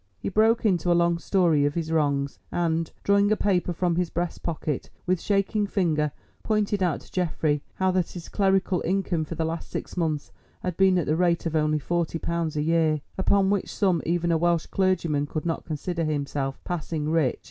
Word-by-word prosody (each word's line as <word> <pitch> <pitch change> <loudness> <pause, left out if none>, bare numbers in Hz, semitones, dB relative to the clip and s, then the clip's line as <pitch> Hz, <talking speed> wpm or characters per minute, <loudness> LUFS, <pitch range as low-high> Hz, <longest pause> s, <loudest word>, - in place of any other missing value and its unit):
He - - -4
broke 220 +3 +3
into 180 -4 +2
a 170 - +4
long 170 0 +2
story 170 -5 +2
of 145 0 0
his 165 -2 -2
wrongs, 140 -3 0
and, 165 -1 0
drawing 200 +1 +3
a - - +5
paper 185 -3 +1
from 175 0 0
his 180 -2 0
breast 175 0 -3
pocket, 155 -4 -3 0.2
with 185 -1 +1
shaking 205 +1 +1
finger 155 -7 +1 0.3
pointed 210 -2 0
out 175 -3 +1
to - - -18
Geoffrey 155 -4 0
how 190 0 +1
that 180 -2 0
his 175 -2 -8
clerical 195 -2 +1
income 180 -3 0
for 165 - -6
the 160 0 -1
last 165 +1 -4
six - - -5
months 160 -4 -1 0.3
had 180 -2 -2
been 190 0 +4
at 170 - +1
the 155 - +1
rate 170 0 +1
of 165 -1 -1
only 155 0 +2
forty 170 +2 -1
pounds 165 -2 -2
a 150 - +1
year, 160 -1 +2 0.2
upon 195 +1 +2
which 200 -2 -1
sum 185 -6 +1
even 170 +1 0
a 165 - +2
Welsh 170 -1 +2
clergyman 170 -6 0
could 155 +2 -4
not 165 -1 -2
consider 165 +2 -3
himself 140 -3 -2
passing 160 -3 -3
rich. 160 -6 +2
170 Hz, 200 wpm, -26 LUFS, 155-185 Hz, 0.3 s, a